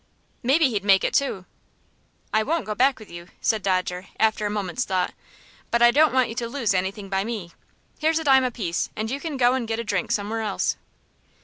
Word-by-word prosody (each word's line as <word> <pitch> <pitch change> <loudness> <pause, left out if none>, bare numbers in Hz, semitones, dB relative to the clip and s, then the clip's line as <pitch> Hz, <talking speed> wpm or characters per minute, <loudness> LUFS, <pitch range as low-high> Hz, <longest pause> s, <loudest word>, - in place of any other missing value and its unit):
"Maybe 270 +2 +3
he'd 205 -3 -2
make 195 -1 +4
it - - 0
two." 200 -10 0 0.9
"I 215 - +4
won't 320 +8 -1
go 215 - -3
back 260 +5 +3
with 215 - -13
you," 170 0 -9
said 220 -2 +1
Dodger, 185 -1 -1
after 220 -1 +2
a - - -3
moment's 205 +2 -2
thought; 185 -5 -1 0.6
"but 235 0 +2
I 240 - +8
don't 305 +3 +4
want 255 -2 +3
you 225 - -6
to 235 -1 -3
lose 235 -6 0
anything 190 +2 -2
by 195 0 0
me. 210 -6 -5 0.5
Here's 320 +1 +2
a 325 - -1
dime 265 -3 +5
apiece, 220 -9 -2
and 220 +2 -3
you 275 - -2
can 305 -2 -4
go 245 -1 +4
and 255 -3 -2
get 225 0 -2
a 230 - -3
drink 200 -5 -2
somewhere 215 +2 -1
else." 210 -3 -1
220 Hz, 215 wpm, -24 LUFS, 195-260 Hz, 0.9 s, I